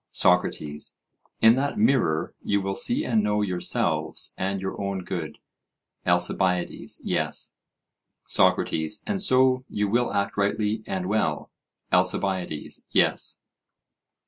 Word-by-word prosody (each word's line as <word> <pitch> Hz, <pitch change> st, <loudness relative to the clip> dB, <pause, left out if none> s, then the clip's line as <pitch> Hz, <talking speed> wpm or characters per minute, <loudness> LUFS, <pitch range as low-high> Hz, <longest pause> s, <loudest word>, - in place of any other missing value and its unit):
SOCRATES: 75 Hz, 0 st, +1 dB, 0.4 s
In 110 Hz, +1 st, +7 dB
that 140 Hz, +7 st, -1 dB
mirror 125 Hz, -, +2 dB
you 100 Hz, -, 0 dB
will 95 Hz, 0 st, -2 dB
see 240 Hz, -, +3 dB
and 115 Hz, -4 st, +2 dB
know 105 Hz, 0 st, +1 dB
yourselves 90 Hz, -3 st, 0 dB
and 95 Hz, +1 st, -2 dB
your 95 Hz, +1 st, -5 dB
own 100 Hz, -1 st, -3 dB
good? 85 Hz, -4 st, -5 dB, 0.7 s
ALCIBIADES: 90 Hz, +1 st, 0 dB
Yes. -, -, -1 dB, 0.7 s
SOCRATES: 80 Hz, +6 st, +1 dB
And 200 Hz, -3 st, -1 dB
so 130 Hz, -7 st, +4 dB
you 105 Hz, 0 st, -1 dB
will 120 Hz, +4 st, +1 dB
act 100 Hz, 0 st, -1 dB
rightly 105 Hz, +2 st, 0 dB
and 95 Hz, -1 st, -3 dB
well? 95 Hz, -6 st, -1 dB, 0.4 s
ALCIBIADES: 90 Hz, -3 st, 0 dB
Yes. -, -, +1 dB
100 Hz, 115 wpm, -25 LUFS, 90-110 Hz, 0.7 s, In